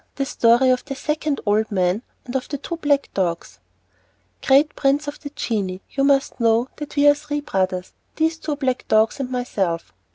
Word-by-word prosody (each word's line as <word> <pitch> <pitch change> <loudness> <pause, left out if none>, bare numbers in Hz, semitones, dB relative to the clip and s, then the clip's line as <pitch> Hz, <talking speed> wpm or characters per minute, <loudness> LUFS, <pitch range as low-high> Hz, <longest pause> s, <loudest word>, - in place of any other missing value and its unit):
The 275 - -1
Story 240 0 +4
of 255 - +1
the 275 -1 -6
Second 300 +1 -2
Old 215 +1 +1
Man, 185 +1 +1 0.2
and 250 0 -7
of 260 - -2
the 285 - -3
Two 335 +5 -5
Black 290 -3 +1
Dogs 175 -3 -2 0.8
Great 280 +3 +4
prince 285 +2 +1
of 290 - -5
the 285 - -7
genii, 200 -9 -3
you 275 - 0
must 275 -1 +2
know 230 +2 +2
that 295 0 -7
we 290 0 +4
are 290 - +8
three 295 0 -4
brothers 185 -7 -2 0.2
these 320 +1 0
two 305 -2 -3
black 260 -3 -2
dogs 220 +4 +3
and 265 -2 -3
myself. 195 -10 -2
265 Hz, 190 wpm, -22 LUFS, 220-290 Hz, 0.8 s, are